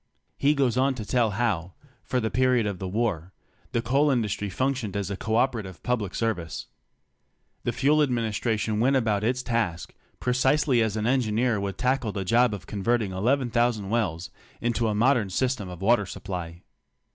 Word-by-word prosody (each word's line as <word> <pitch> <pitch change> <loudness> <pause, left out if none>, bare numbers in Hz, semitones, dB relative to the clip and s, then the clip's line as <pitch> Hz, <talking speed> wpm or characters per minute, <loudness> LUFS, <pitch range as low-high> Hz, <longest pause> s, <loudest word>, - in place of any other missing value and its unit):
He 145 +2 +2
goes 130 -4 +1
on 135 +1 +2
to 110 -4 -6
tell 115 +1 +2
how, 95 -5 -1 0.3
for 125 - -1
the 110 -2 -2
period 125 -2 +3
of 100 -3 -3
the 95 - -4
war, 95 -4 -2 0.4
the 115 - -1
coal 140 +5 +3
industry 105 -5 0
functioned 125 -2 -1
as 100 -1 -3
a - - -2
co 110 +3 -2
operative 110 -8 -1
public 110 -6 -1
service. 90 -9 -2 1.0
The - - +1
Fuel 150 +3 +3
Administration 110 -4 0
went 130 +4 +3
about 110 -5 +1
its 125 +3 0
task 115 -9 -2 0.3
precisely 130 +1 +2
as 110 -1 0
an 105 - -1
engineer 120 -2 +1
would 100 -1 -4
tackle 125 -3 0
the 95 -1 -3
job 120 +4 +4
of 100 - -10
converting 105 0 0
11,000 120 0 +1
wells 90 -8 -1 0.3
into 120 -1 0
a 105 - 0
modern 115 -2 +3
system 120 0 -1
of 90 +1 -8
water 105 -2 +3
supply. 85 -3 -6
115 Hz, 170 wpm, -26 LUFS, 100-125 Hz, 1.0 s, job